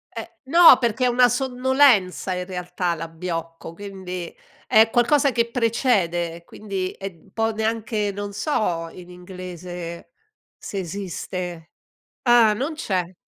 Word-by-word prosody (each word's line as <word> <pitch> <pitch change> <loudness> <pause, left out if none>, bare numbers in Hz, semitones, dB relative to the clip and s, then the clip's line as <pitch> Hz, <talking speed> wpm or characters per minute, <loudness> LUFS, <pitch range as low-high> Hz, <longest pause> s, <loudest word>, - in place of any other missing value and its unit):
Eh. - - -5 0.2
No, 330 -1 +8
perché 240 0 0
è - - +4
una 245 0 +4
sonnolenza 255 -7 +2
in 180 0 -3
realtà 180 -1 -3
l'abbiocco, 165 0 -6
quindi, 185 -2 -7 0.3
è 220 +1 +6
qualcosa 270 +4 +3
che 235 -1 0
precede, 185 -9 0
quindi 195 -3 -4
è 195 - -10 0.2
un 195 - -23
po' 225 +2 0
neanche 220 -1 -1
non 205 0 -6
so 180 - -1
in 180 -1 -12
inglese 180 -1 -8 0.5
se 200 - -6
esiste. 180 -2 -6 0.5
Ah, 240 -3 +5
non 270 +9 -3
c'è. 185 - -3
195 Hz, 125 wpm, -23 LUFS, 180-235 Hz, 0.5 s, No